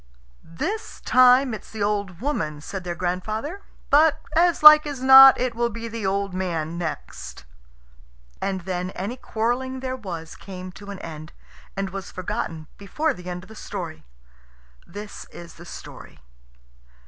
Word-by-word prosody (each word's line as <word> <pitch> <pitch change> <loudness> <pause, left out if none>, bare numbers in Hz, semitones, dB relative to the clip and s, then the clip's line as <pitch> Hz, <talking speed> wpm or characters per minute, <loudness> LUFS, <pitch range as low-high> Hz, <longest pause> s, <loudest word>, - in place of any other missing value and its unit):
"This 390 - -5
time 255 0 +5
it's 215 - -8
the 215 -2 -4
old 200 -3 -2
woman," 155 - -2
said 190 +5 -7
their 175 -1 -4
grandfather; 215 - -3 0.3
"but, 310 +1 +5 0.2
as 345 -1 +3
like 305 0 +10
as 275 -3 -5
not, 265 0 +10
it 250 -1 -1
will 235 0 0
be 230 +1 -6
the 225 -3 -4
old 195 0 -1
man 170 -3 -3
next." 65 - -6 1.0
And 190 -1 -2
then 180 0 -3
any 200 +7 -3
quarrelling 255 +2 -2
there 260 0 -3
was 170 -9 -7
came 185 -1 -9
to 200 +2 -12
an 200 - -6
end, 155 -1 -9 0.4
and 195 -1 -2
was 195 0 -6
forgotten 165 -3 -4
before 300 +10 -1
the 180 -5 -9
end 180 0 -6
of - - -15
the 220 - -12
story. 175 -7 -7 0.8
This 205 +3 -9
is 170 -1 -12
the 170 - -13
story. - - -11
200 Hz, 155 wpm, -24 LUFS, 180-255 Hz, 1.0 s, like